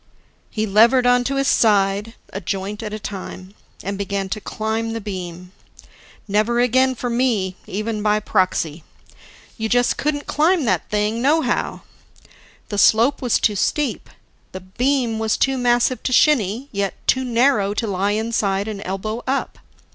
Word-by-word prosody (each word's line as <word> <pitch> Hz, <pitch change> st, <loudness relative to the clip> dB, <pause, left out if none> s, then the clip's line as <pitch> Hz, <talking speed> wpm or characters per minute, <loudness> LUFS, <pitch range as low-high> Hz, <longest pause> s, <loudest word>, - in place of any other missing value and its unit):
He 215 Hz, 0 st, -2 dB
levered 230 Hz, +5 st, +4 dB
onto 245 Hz, +2 st, +2 dB
his 275 Hz, 0 st, +1 dB
side, 205 Hz, 0 st, +2 dB, 0.2 s
a 195 Hz, -, -4 dB
joint 195 Hz, +3 st, -4 dB
at 215 Hz, -2 st, -5 dB
a 215 Hz, -, -4 dB
time, 190 Hz, -2 st, -8 dB, 0.3 s
and 200 Hz, +1 st, -4 dB
began 200 Hz, -1 st, -2 dB
to 215 Hz, -, -4 dB
climb 220 Hz, +2 st, -3 dB
the 230 Hz, -, -3 dB
beam. 180 Hz, -3 st, -7 dB, 0.8 s
Never 215 Hz, +4 st, +1 dB
again 260 Hz, +2 st, +3 dB
for 245 Hz, -, -4 dB
me, 235 Hz, -6 st, 0 dB
even 215 Hz, +2 st, -3 dB
by 210 Hz, 0 st, +2 dB
proxy! 170 Hz, -5 st, 0 dB, 0.8 s
You 220 Hz, 0 st, -2 dB
just 245 Hz, +1 st, +2 dB
couldn't 290 Hz, 0 st, -1 dB
climb 320 Hz, 0 st, +2 dB
that 185 Hz, -6 st, 0 dB
thing 210 Hz, +2 st, 0 dB
nohow! 305 Hz, +5 st, +1 dB, 0.9 s
The 205 Hz, -, -2 dB
slope 230 Hz, +8 st, +4 dB
was 245 Hz, -3 st, +1 dB
too 210 Hz, -, +1 dB
steep. 295 Hz, +8 st, -1 dB, 0.4 s
The 185 Hz, -, -6 dB
beam 235 Hz, +4 st, -1 dB
was 220 Hz, -1 st, 0 dB
too 270 Hz, 0 st, +1 dB
massive 245 Hz, 0 st, +1 dB
to -, -, -2 dB
shinny, 250 Hz, -3 st, +3 dB
yet 200 Hz, -2 st, -2 dB
too 260 Hz, -, +2 dB
narrow 235 Hz, -4 st, +2 dB
to 230 Hz, -, -1 dB
lie 200 Hz, 0 st, 0 dB
inside 210 Hz, -2 st, -1 dB
and 210 Hz, -2 st, -5 dB
elbow 215 Hz, +5 st, -4 dB
up. 270 Hz, +1 st, -2 dB
220 Hz, 155 wpm, -21 LUFS, 200-245 Hz, 0.9 s, levered